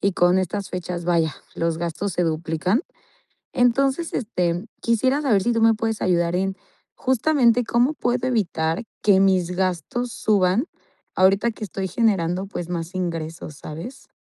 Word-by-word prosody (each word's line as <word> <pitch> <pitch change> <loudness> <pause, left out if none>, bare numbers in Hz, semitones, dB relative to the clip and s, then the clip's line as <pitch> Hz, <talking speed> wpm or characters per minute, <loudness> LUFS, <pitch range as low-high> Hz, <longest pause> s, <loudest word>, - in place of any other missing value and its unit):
y 200 -1 +1
con 175 +1 +3
estas 195 +2 -3
fechas, 180 -1 -4
vaya, 165 -4 +1 0.2
los 165 -1 -1
gastos 170 +3 -3
se 180 - +1
duplican. 165 - 0 0.7
Entonces, 270 +6 +2
este, 180 -4 -1 0.2
quisiera 260 +5 +2
saber 215 -9 +3
si 240 - +2
tú 230 -1 +1
me 225 0 +6
puedes 225 0 -2
ayudar 175 -1 +1
en, 190 +1 -1 0.4
justamente 255 -2 +3
cómo 245 +6 +2
puedo 245 -1 -1
evitar 170 -8 0 0.2
que 195 -2 +5
mis 185 -2 +3
gastos 190 +7 -2
suban, 205 - +2 0.5
ahorita 195 +5 +4
que 220 - -14
estoy 195 -1 -4
generando, 190 -3 +1
pues 175 -3 -6
más 170 +1 -4
ingresos, 165 -4 -4
¿sabes? 165 - -9
190 Hz, 150 wpm, -23 LUFS, 175-235 Hz, 0.7 s, me